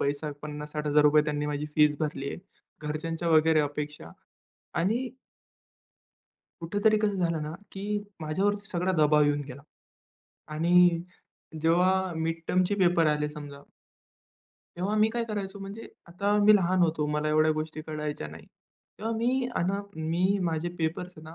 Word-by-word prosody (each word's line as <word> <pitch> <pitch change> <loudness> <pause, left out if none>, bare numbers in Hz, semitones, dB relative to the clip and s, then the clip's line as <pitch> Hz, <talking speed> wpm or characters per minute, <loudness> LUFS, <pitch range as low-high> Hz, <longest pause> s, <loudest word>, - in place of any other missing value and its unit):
पैसा 145 +2 -1
₹50,000-₹60,000 150 0 +2
त्यांनी 150 -1 -2
माझी 150 0 -2
फीस 150 -1 +4
भरली 145 -3 -2
आहे. - - -5 0.4
घरच्यांच्या 165 +3 -3
वगैरे 160 -1 +5
अपेक्षा 145 - -4 0.7
आणि 230 +9 0 1.5
कुठेतरी 205 +5 +2
कसं 210 -2 0
झालं 170 -3 0
ना, 150 +1 -5 0.2
की 205 +2 -2 0.2
माझ्यावरती 195 +6 -1
सगळा 180 -1 0
दबाव 150 0 +5
येऊन 145 0 +1
गेला 140 0 -10 0.9
आणि 175 +2 +4 0.6
जेव्हा 180 +3 +2
मिड 165 +1 -2
टर्मचे 185 +2 +2
पेपर 175 -3 +4
आले 150 0 +1
समजा 145 -2 -9 1.2
तेव्हा 190 +4 -1
मी 215 +1 +4
काय 235 +1 -2
करायचो 205 -3 -4
म्हणजे 200 +3 -8 0.2
आता 200 +4 0
मी 215 +1 +8
लहान 185 -1 +1
होतो 160 -2 +1
मला 150 +1 -1
एवढ्या 155 +1 +3
गोष्टी 155 0 -4
कळायच्या 150 - -4
नाही. 80 +1 -12 0.5
तेव्हा 225 +2 -2
मी 250 +3 +1
अन् 175 - +1 0.4
मी 185 +4 +2
माझे 165 -1 -1
पेपर्स 165 +3 -2
ना, 160 +1 -11
165 Hz, 140 wpm, -28 LUFS, 150-190 Hz, 1.5 s, मी